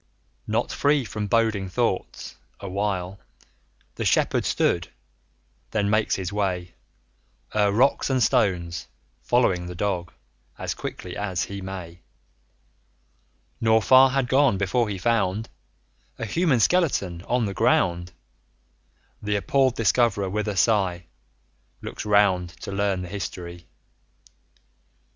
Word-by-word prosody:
Not -, -, 0 dB
free 145 Hz, -2 st, +2 dB
from 105 Hz, -1 st, -4 dB
boding 110 Hz, -3 st, +1 dB
thoughts, 90 Hz, -, -2 dB, 0.2 s
a 100 Hz, -, -7 dB
while 95 Hz, -1 st, -2 dB, 0.8 s
The -, -, -2 dB
Shepherd -, -, +2 dB
stood; -, -, +1 dB, 0.8 s
then 105 Hz, -2 st, 0 dB
makes 110 Hz, 0 st, +2 dB
his 95 Hz, 0 st, -4 dB
way 90 Hz, -4 st, -2 dB, 0.8 s
35 110 Hz, -, +1 dB
O'er -, -, +1 dB
rocks 130 Hz, +7 st, +2 dB
and 130 Hz, -2 st, +2 dB
stones, 85 Hz, -6 st, 0 dB, 0.3 s
following 95 Hz, -8 st, +1 dB
the 90 Hz, -, -7 dB
Dog 90 Hz, -2 st, -2 dB, 0.5 s
As -, -, -3 dB
quickly 90 Hz, -, -7 dB
as 95 Hz, -5 st, -2 dB
he 100 Hz, +3 st, -6 dB
may; 90 Hz, -3 st, -7 dB, 1.6 s
Nor 110 Hz, 0 st, +4 dB
far 130 Hz, +3 st, +6 dB
had 135 Hz, -1 st, 0 dB
gone 135 Hz, -5 st, +3 dB
before 105 Hz, +4 st, 0 dB
he 100 Hz, -, -3 dB
found 105 Hz, 0 st, 0 dB, 0.7 s
A 115 Hz, -, -4 dB
human 145 Hz, -, +1 dB
skeleton 110 Hz, -, +1 dB
on 125 Hz, -2 st, +1 dB
the 100 Hz, -, -3 dB
ground; 90 Hz, -1 st, +1 dB, 1.1 s
The 105 Hz, 0 st, -1 dB
appalled 130 Hz, +6 st, +2 dB
Discoverer 105 Hz, -3 st, +2 dB
with 105 Hz, +1 st, -2 dB
a 105 Hz, -2 st, -2 dB
sigh 95 Hz, -4 st, +2 dB, 0.8 s
40 -, -, -25 dB
Looks -, -, -6 dB
round, 100 Hz, -4 st, +3 dB
to -, -, -6 dB
learn 100 Hz, -2 st, 0 dB
the -, -, -6 dB
history. 90 Hz, -3 st, -7 dB
100 Hz, 125 wpm, -24 LUFS, 90-115 Hz, 1.6 s, far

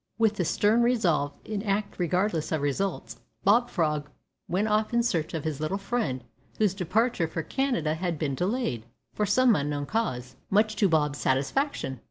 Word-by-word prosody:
With 220 Hz, -2 st, +2 dB
this 180 Hz, -, 0 dB
stern 215 Hz, +3 st, +3 dB
resolve, 175 Hz, -, +2 dB
to 210 Hz, -2 st, -4 dB
act 200 Hz, -1 st, -2 dB
regardless 180 Hz, -1 st, 0 dB
of 155 Hz, -3 st, 0 dB
results, 140 Hz, -6 st, -2 dB, 0.2 s
Bob 235 Hz, +5 st, +4 dB
Frog 150 Hz, -3 st, -1 dB, 0.4 s
went 195 Hz, +5 st, 0 dB
off 215 Hz, +2 st, +1 dB
in 235 Hz, -, +3 dB
search 165 Hz, -9 st, -1 dB
of 155 Hz, -, -3 dB
his 155 Hz, -3 st, -3 dB
little 155 Hz, +6 st, -1 dB
friend, 195 Hz, -, -2 dB, 0.3 s
whose 210 Hz, -4 st, +2 dB
departure 195 Hz, +1 st, +1 dB
for 165 Hz, 0 st, -4 dB
Canada 245 Hz, -, 0 dB
had 170 Hz, 0 st, -2 dB
been 145 Hz, -2 st, -1 dB
delayed, 180 Hz, -, -2 dB, 0.3 s
from 210 Hz, -, 0 dB
some 255 Hz, +1 st, +4 dB
unknown 145 Hz, 0 st, -1 dB
cause, 130 Hz, -, -2 dB
much 215 Hz, +2 st, +3 dB
to 200 Hz, -1 st, +3 dB
Bob's 150 Hz, -3 st, +1 dB
satisfaction. 135 Hz, -, 0 dB
180 Hz, 170 wpm, -27 LUFS, 150-215 Hz, 0.4 s, Bob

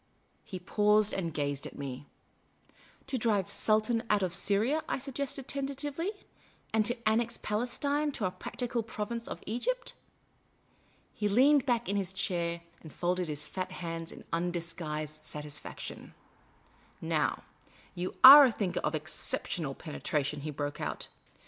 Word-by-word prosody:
He 195 Hz, -4 st, -7 dB
paused 210 Hz, +3 st, +3 dB
and 170 Hz, -4 st, -2 dB
gazed 145 Hz, -2 st, -2 dB
at -, -, -12 dB
me. 140 Hz, 0 st, -6 dB, 0.5 s
" -, -, -29 dB
To 265 Hz, -1 st, -2 dB
drive 210 Hz, -4 st, +2 dB
the 200 Hz, -, -11 dB
Sultan 215 Hz, +3 st, +2 dB
out 210 Hz, -2 st, +3 dB
of 180 Hz, -2 st, -1 dB
Syria," 210 Hz, -, +1 dB
I -, -, 0 dB
suggested 275 Hz, 0 st, -4 dB
tenta 275 Hz, 0 st, -2 dB
tively, 295 Hz, +5 st, -3 dB, 0.3 s
" -, -, -32 dB
and 220 Hz, -1 st, +4 dB
to 240 Hz, +2 st, +2 dB
annex 230 Hz, +2 st, +1 dB
Palestine 280 Hz, +7 st, 0 dB
to 210 Hz, -, -2 dB
our 185 Hz, -, 0 dB
practical 240 Hz, +4 st, -3 dB
province 225 Hz, +1 st, -4 dB
of -, -, -7 dB
Egypt?" 485 Hz, -, -2 dB, 1.2 s
He 210 Hz, -1 st, -1 dB
leaned 270 Hz, +5 st, +5 dB
back 240 Hz, -2 st, +1 dB
in 200 Hz, -, 0 dB
his 190 Hz, -2 st, -1 dB
chair 170 Hz, -2 st, -1 dB, 0.2 s
and 155 Hz, -, -11 dB
folded 180 Hz, 0 st, -1 dB
his 150 Hz, -1 st, -1 dB
fat 185 Hz, -1 st, -5 dB
hands 165 Hz, -2 st, -5 dB
in -, -, -11 dB
undisguised 165 Hz, -3 st, -3 dB
satisfaction, 150 Hz, -1 st, -7 dB, 0.4 s
" -, -, -32 dB
Now, -, -, 0 dB, 0.5 s
you 180 Hz, +1 st, -4 dB
are 280 Hz, +2 st, +13 dB
a 255 Hz, -, +3 dB
thinker 190 Hz, -5 st, -1 dB
of 155 Hz, -, -1 dB
ex 155 Hz, +2 st, -5 dB
ceptional 150 Hz, -6 st, -3 dB
penetration," 150 Hz, -2 st, -2 dB
he 155 Hz, -, -4 dB
broke 145 Hz, 0 st, -4 dB
out. -, -, -4 dB
200 Hz, 155 wpm, -31 LUFS, 165-240 Hz, 1.2 s, are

